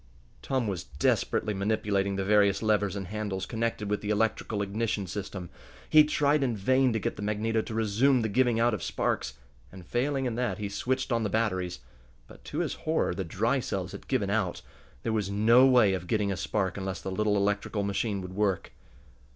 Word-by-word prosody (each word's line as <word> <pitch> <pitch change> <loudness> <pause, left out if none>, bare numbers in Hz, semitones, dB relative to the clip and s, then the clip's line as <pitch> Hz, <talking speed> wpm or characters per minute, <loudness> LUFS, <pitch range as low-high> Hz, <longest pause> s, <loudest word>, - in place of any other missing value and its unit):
Tom 130 -3 -1
was 95 -4 -3
desperately 75 +8 0
manipulating 100 -1 0
the 95 0 -2
various 100 0 +3
levers 105 -2 +1
and 100 -1 -4
handles 100 -3 -3
connected 115 -1 -2
with 105 0 -1
the 105 - -4
electrical 105 -1 0
ignition 100 0 -2
system. 95 -1 -6 0.4
He 155 -1 +7
tried 150 0 +2
in 120 -5 0
vain 130 +5 +3
to 110 - 0
get - - -3
the - - -6
magneto 110 +2 0
to 110 - -7
resume 115 +4 +2
the - - +1
giving 120 +1 +2
out 120 0 +3
of 105 - -3
sparks, - - -2 0.4
and, 95 -2 -11
failing 135 +5 -1
in 125 - -1
that, 125 +1 -1
he 105 -2 -4
switched 130 +7 -2
on 115 -1 +2
the 105 - -1
batteries. 95 -5 -1 0.4
But, - - -16
to - - -3
his - - -1
horror, 160 - 0
the 95 +2 -3
dry 115 +10 0
cells 95 -6 -3
had - - -10
given 105 -7 0
out. 100 -4 -1 0.4
There 115 - -1
was 105 -3 -1
no 115 +6 +5
way 120 -7 +5
of 90 -1 -4
getting 105 -1 +1
a - - -1
spark 95 -1 -1
unless 95 -1 -4
the 95 - -5
little 105 +2 +1
electrical 100 +1 0
machine 100 0 -1
would 90 0 -8
work. 100 -3 0
105 Hz, 200 wpm, -28 LUFS, 100-115 Hz, 0.4 s, He